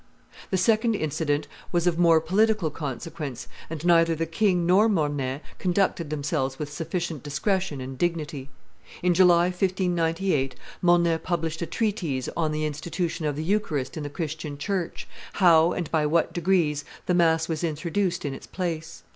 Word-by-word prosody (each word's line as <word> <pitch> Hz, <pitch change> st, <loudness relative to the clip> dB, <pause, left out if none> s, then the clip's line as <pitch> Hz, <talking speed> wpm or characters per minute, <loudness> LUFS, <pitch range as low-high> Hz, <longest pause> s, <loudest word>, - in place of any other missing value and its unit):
The 190 Hz, -, +1 dB
second 220 Hz, +4 st, +3 dB
incident 150 Hz, -3 st, -1 dB, 0.2 s
was 175 Hz, -1 st, +1 dB
of 175 Hz, -1 st, +1 dB
more 165 Hz, -2 st, +6 dB
political 195 Hz, +1 st, +2 dB
consequence, 145 Hz, -2 st, -5 dB, 0.2 s
and 165 Hz, 0 st, -5 dB
neither 165 Hz, -1 st, +5 dB
the 165 Hz, +1 st, -1 dB
king 180 Hz, +1 st, +1 dB
nor 195 Hz, +6 st, +5 dB
Mornay 145 Hz, -7 st, -1 dB, 0.2 s
conducted 180 Hz, -3 st, +1 dB
themselves 145 Hz, -3 st, -2 dB
with 145 Hz, -1 st, -5 dB
sufficient 165 Hz, -1 st, -3 dB
discretion 185 Hz, +1 st, -1 dB
and 130 Hz, 0 st, -7 dB
dignity. 150 Hz, -5 st, -2 dB, 0.5 s
In 180 Hz, 0 st, +4 dB
July, 175 Hz, -1 st, +6 dB
1598, 180 Hz, -6 st, 0 dB, 0.3 s
Mornay 170 Hz, -2 st, +3 dB
published 165 Hz, -2 st, -2 dB
a 170 Hz, -, -2 dB
treatise 180 Hz, -, -1 dB
on 160 Hz, -2 st, 0 dB
the 155 Hz, 0 st, -1 dB
institution 165 Hz, +2 st, -3 dB
of 145 Hz, -, -1 dB
the 155 Hz, -, -3 dB
eucharist 160 Hz, -8 st, -1 dB
in 155 Hz, -, -4 dB
the 145 Hz, -, -4 dB
Christian 155 Hz, -2 st, -5 dB
church, 180 Hz, +3 st, -3 dB, 0.3 s
how 170 Hz, -3 st, +5 dB
and 175 Hz, -4 st, -3 dB
by 155 Hz, -2 st, +2 dB
what 165 Hz, +2 st, +1 dB
degrees 170 Hz, -4 st, +1 dB, 0.2 s
the 180 Hz, -, +1 dB
mass 165 Hz, -2 st, +3 dB
was 160 Hz, 0 st, -3 dB
introduced 170 Hz, +3 st, -1 dB
in 140 Hz, -, -2 dB
its -, -, -10 dB
place. 165 Hz, -3 st, -4 dB
165 Hz, 155 wpm, -26 LUFS, 150-180 Hz, 0.5 s, more